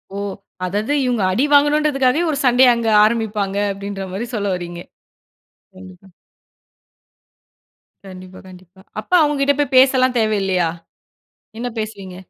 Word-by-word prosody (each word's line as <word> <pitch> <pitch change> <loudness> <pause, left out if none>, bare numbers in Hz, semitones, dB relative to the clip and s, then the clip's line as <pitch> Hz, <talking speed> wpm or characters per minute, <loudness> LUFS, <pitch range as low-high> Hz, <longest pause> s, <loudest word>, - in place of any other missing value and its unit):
ஓ! - - -5 0.5
அதாவது 210 +9 -2
இவுங்க 240 -5 -1
அடி 245 +10 +1
வாங்கணுன்றதுக்காகவே 290 -1 +2
ஒரு 285 - -3
சண்டைய 250 0 +5
அங்க 230 -1 -2
ஆரம்பிப்பாங்க, 215 -3 -1 0.2
அப்பிடின்றமாரி 195 +2 -6
சொல்ல 205 -2 -2
வரீங்க? 175 -1 -7 1.0
கண்டிப்பா. 185 0 -14 2.0
கண்டிப்பா, 185 -1 -12
கண்டிப்பா. 185 0 -16 0.2
அப்ப 215 - -11
அவுங்கக்கிட்ட 285 -1 +1
போய் 285 -2 -1
பேசலாம் 255 -1 +4
தேவையில்லயா? 195 -6 0 0.9
என்ன 245 +1 -3
பேசுவீங்க? 200 -4 -7
215 Hz, 105 wpm, -18 LUFS, 190-255 Hz, 2.0 s, சண்டைய